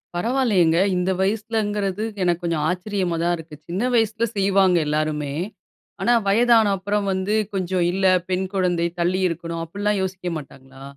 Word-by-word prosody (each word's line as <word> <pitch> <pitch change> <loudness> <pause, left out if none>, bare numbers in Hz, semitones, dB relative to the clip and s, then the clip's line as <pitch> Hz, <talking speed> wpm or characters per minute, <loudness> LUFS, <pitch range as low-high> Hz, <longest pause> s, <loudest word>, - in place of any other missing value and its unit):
பரவால்லையேங்க. 200 -6 +2 0.2
இந்த 180 +1 0
வயசுலேங்கிறது, 210 -1 -1 0.2
எனக்கு 175 -1 +1
கொஞ்சம் 160 -3 0
ஆச்சரியமா 180 -1 -2
தான் 175 0 +2
இருக்கு. 160 -1 -10
சின்ன 185 +7 -2
வயசுல 225 0 +1
செய்வாங்க 195 -2 +3
எல்லாருமே. 150 -1 -1 0.7
ஆனா 240 - +3
வயதான 230 +1 +4
அப்புறம் 205 +1 -1
வந்து 190 +3 -1 0.2
கொஞ்சம் 185 -2 0
இல்ல 190 +1 -1 0.2
பெண் 185 +1 0
குழந்தை, 175 -2 +1
தள்ளி 185 +2 +1
இருக்கணும். 165 0 -4
அப்படில்லாம் 205 +3 -1
யோசிக்க 190 -1 -3
மாட்டாங்களா? 135 -2 -12
185 Hz, 135 wpm, -22 LUFS, 170-205 Hz, 0.7 s, வயதான